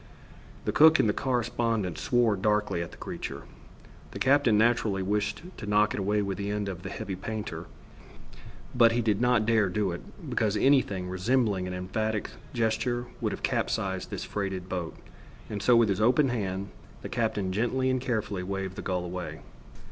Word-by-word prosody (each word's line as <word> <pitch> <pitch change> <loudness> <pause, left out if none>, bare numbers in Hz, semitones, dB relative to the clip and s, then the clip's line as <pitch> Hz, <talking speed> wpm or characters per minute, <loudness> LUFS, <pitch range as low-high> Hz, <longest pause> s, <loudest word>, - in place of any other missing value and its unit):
The - - +1
cook 160 +1 +7
and - - +3
the 105 - +2
correspondent 115 - -1
swore 120 -4 +2
darkly 105 -3 +1
at 85 - -4
the - - -14
creature. - - -6 0.7
The - - -8
captain 135 -5 +4
naturally 110 -4 +2
wished 105 - -1
to 105 - -7
knock 105 0 +3
it - - -3
away 105 +2 +1
with 100 -1 -3
the 100 0 -2
end 105 0 -2
of 90 -3 -5
the 95 - -6
heavy 100 -1 -5
painter; 95 -4 -5 1.1
but 115 -2 +5
he 120 - +1
did 105 -1 +1
not 125 -3 +3
dare 110 -3 +3
do 100 0 0
it, 85 - -5 0.3
because 105 -1 0
anything 105 -10 +3
resembling 95 0 +1
an 90 - -4
emphatic 110 +4 -2 0.2
gesture 120 +1 0 0.2
would - - 0
have - - -6
capsized - - -1
this - - -4
freighted 95 -3 -3
boat, 90 -3 -4 0.5
and 105 -1 -3
so 125 - +5
with 115 -2 +5
his 100 +1 0
open 130 +5 +4
hand, 100 -4 -2 0.3
the - - -4
captain 105 -5 -1
gently 120 +6 0
and 130 -1 +1
carefully 110 -6 -2
waved 95 0 -4
the - - -4
gull 90 -1 -2
away. 90 0 -6
105 Hz, 180 wpm, -28 LUFS, 95-115 Hz, 1.1 s, cook